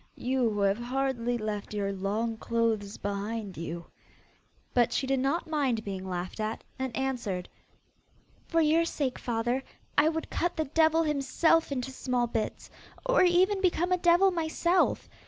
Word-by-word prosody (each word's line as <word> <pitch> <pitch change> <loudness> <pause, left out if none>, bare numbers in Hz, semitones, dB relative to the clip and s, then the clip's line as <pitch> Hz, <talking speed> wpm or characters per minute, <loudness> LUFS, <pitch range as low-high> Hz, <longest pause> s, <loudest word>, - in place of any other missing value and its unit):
You 255 -2 +1
who 205 -1 -2
have 200 +2 +2
hardly 245 -1 -1
left 215 -1 -4
your 200 -1 -1
long 210 +4 -1
clothes 225 -3 -1
behind 205 0 -4
you!' 165 +1 -5 0.9
but 240 -2 +3
she - - 0
did 270 0 +1
not 275 +6 0
mind 275 -8 0
being 190 -1 -5
laughed 180 +3 -4
at, 215 +1 -3 0.2
and 260 -3 -3
answered, 240 -9 -2 1.0
'For 330 -1 +2
your 320 +2 +4
sake, 280 -6 -2
father, 240 +2 -1 0.4
I 305 +2 +5
would 320 0 -4
cut 350 - 0
the 315 - +1
devil 320 +2 +3
himself 305 +2 +2
into 265 -1 -2
small 250 -2 0
bits, 225 -2 -3 0.3
or - - +4
even 370 +3 +3
become 360 -1 +1
a 365 - +4
devil 350 +3 +5
myself. 340 +1 +1
255 Hz, 155 wpm, -29 LUFS, 215-320 Hz, 1.0 s, I